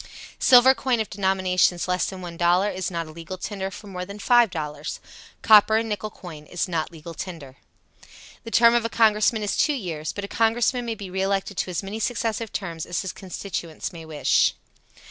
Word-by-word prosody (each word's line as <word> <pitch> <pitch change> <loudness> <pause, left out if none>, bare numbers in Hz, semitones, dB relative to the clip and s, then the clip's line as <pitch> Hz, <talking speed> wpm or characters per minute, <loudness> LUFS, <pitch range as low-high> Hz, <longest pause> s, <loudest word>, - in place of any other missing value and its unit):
Silver 255 +1 +7
coin 255 -3 0
of 220 - -3
denominations 185 -2 +1
less 180 0 0
than 190 -1 -8
$1 175 +3 +1
is 185 -1 -2
not 170 -2 -3
a 155 - -11
legal 170 +3 -8
tender 190 0 -4
for 205 +2 -11
more 185 -2 -6
than 200 +2 -8
$5.00. 170 -11 +1 0.5
Copper 215 0 +7
and 225 0 -1
nickel 210 0 -3
coin 160 -7 -11
is 175 - -2
not 165 -3 -2
legal 165 0 -10
tender. 150 -6 -8 0.9
The 230 - -7
term 235 0 +5
of 240 -1 +2
a 230 - -1
Congressman 220 -1 +3
is 205 - -1
two 300 - +2
years, 165 - -4
but 205 - -5
a - - -8
Congressman 235 +3 +1
may 225 - -2
be 195 -3 -8
re 190 +1 -2
elected 195 +1 -1
to - - -1
as 180 +2 -3
many 200 +3 -5
successive 225 -1 -2
terms 165 -5 -5
as 175 +1 -2
his 190 - -5
constituents 180 -3 -6
may 165 -1 -9
wish. 155 -2 +2
190 Hz, 195 wpm, -24 LUFS, 175-220 Hz, 0.9 s, Silver